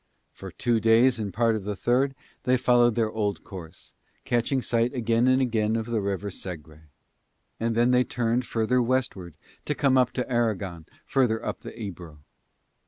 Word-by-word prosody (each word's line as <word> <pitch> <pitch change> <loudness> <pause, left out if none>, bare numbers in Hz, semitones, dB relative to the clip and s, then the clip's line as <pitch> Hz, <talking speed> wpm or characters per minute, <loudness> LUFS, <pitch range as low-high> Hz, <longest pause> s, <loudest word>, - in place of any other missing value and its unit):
For 95 - -9
two 115 +7 0
days 115 +3 +4
and 105 -2 -3
part 115 +4 +2
of 105 - -4
the 105 +1 -3
third 130 +6 +1 0.3
they 130 0 +2
followed 120 -2 +3
their 110 -2 +1
old 105 -2 -2
course, 85 -3 -11 0.3
catching 120 +3 +1
sight 120 +1 0
again 115 0 +2
and 130 0 +4
again 110 -3 0
of 115 -1 -1
the 115 -2 -1
river 100 0 -3
Segre; 80 -4 -9 0.7
and 115 0 -1
then 120 +2 +3
they 125 0 +4
turned 120 0 -1
further 115 +3 +1
west 130 +1 0
ward 85 -5 -10 0.3
to 150 - -1
come 130 -2 +4
to 125 +1 -4
Aragon 100 -9 -1 0.2
further 120 -4 +1
up - - -3
the - - -10
Ebro. 90 -7 -8
115 Hz, 170 wpm, -26 LUFS, 100-125 Hz, 0.7 s, days